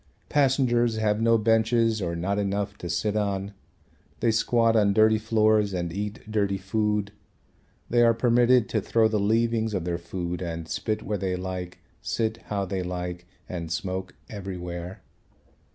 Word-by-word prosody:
Passengers 125 -5 +2
have 105 0 +1
no 115 0 +4
benches 115 0 +2
or 85 -2 -2
not 100 +4 -1
enough 100 0 -1
to 85 - -6
sit 95 +5 -1
on. 100 -1 -1 0.7
They 115 0 +2
squat 115 0 +2
on 100 -2 +4
dirty 110 +1 +4
floors 110 -2 +2
and 85 -2 -3
eat 105 +4 -4
dirty 100 -2 +1
food. 105 +1 -1 0.8
They 120 0 +3
are 115 -1 +5
permitted 120 0 +4
to 110 - 0
throw 115 +2 +3
the 110 -1 0
leavings 110 +1 +1
of 90 -3 -2
their 85 -1 -2
food 85 0 -4
and 85 -2 -4
spit 110 +4 -2
where 105 -2 -2
they 95 -1 -1
like, 90 -1 -5 0.2
sit 110 -1 -1
how 100 -2 -2
they 95 0 -3
like 90 -1 -5 0.2
and 85 -3 -5
smoke 95 +2 -3
everywhere. 90 -3 -6
105 Hz, 155 wpm, -26 LUFS, 90-110 Hz, 0.8 s, are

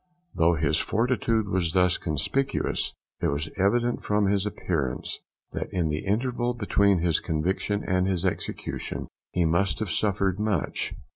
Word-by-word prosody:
Though 85 0 +3
his 80 0 +1
fortitude 115 0 +1
was 90 -3 0
thus 90 -1 +3
conspicuous, 110 - -1 0.3
it - - +2
was 75 +3 -1
evident 120 +5 +1
from 105 0 +2
his 100 +1 +2
appearance 80 -10 -2 0.3
that - - -4
in 85 -4 0
the 75 +5 -3
interval 120 +3 0
between 100 -3 +3
his 85 -3 +2
conviction 95 +5 -1
and 90 0 +1
his 95 -1 0
execution 95 - -3 0.2
he 90 -2 +1
must 85 +4 +2
have 110 -5 -3
suffered 100 0 +1
much. 105 -6 -1
95 Hz, 145 wpm, -26 LUFS, 85-105 Hz, 0.3 s, Though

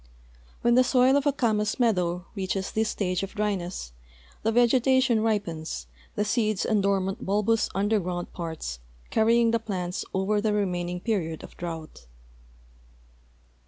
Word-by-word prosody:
When 240 0 +4
the 255 +1 +6
soil 255 +1 +4
of 285 +1 +2
a - - +5
camas 220 -4 0
meadow 180 -7 +1
reaches 195 -1 -2
this 220 0 0
stage 185 -3 -1
of 195 +1 -6
dryness, 190 - -2 0.5
the 225 - +1
vegetation 245 0 +4
ripens, 195 -8 -2 0.3
the 210 - 0
seeds 215 -2 +1
and 215 -2 +2
dormant 195 -1 0
bulbous 210 +3 +1
underground 195 -3 -1
parts 160 - -5 0.3
carry 225 +2 +4
ing 230 -1 +3
the 230 - +2
plants 185 -5 -3
over 200 +2 +1
the 215 0 +1
remaining 180 -3 -1
period 175 -8 -2
of - - -11
drought. 160 - -7
205 Hz, 140 wpm, -26 LUFS, 180-225 Hz, 0.5 s, the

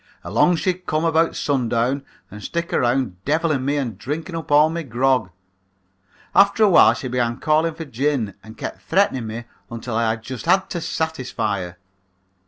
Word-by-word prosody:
Along 180 - +3
she'd 180 +2 -2
come 155 +1 0
about 165 0 +2
sun 130 -5 0
down 125 +5 0 0.3
and 105 +1 -9
stick 170 0 -3
around 120 -7 0
devilin' 155 -2 +1
me 140 +2 0
and 120 -8 -3
drinking 160 +7 -4
up 165 -2 -6
all 150 +1 +6
my 165 +1 -3
grog. 130 - +1 1.0
After 200 +2 +5
a 210 - +6
while 180 - +6
she 130 - -5
began 120 -1 -1
calling 155 +1 +1
for 165 0 -6
gin 130 -5 -1
and 110 0 -12
kept - - -6
threatening 160 - +1
me 115 +2 -5 0.3
until 115 0 -5
I 115 -1 +1
just 115 +2 -8
had 190 0 +3
to 170 - -3
satisfy 130 -12 -2
her. 90 -1 -7
135 Hz, 175 wpm, -21 LUFS, 115-160 Hz, 1.0 s, all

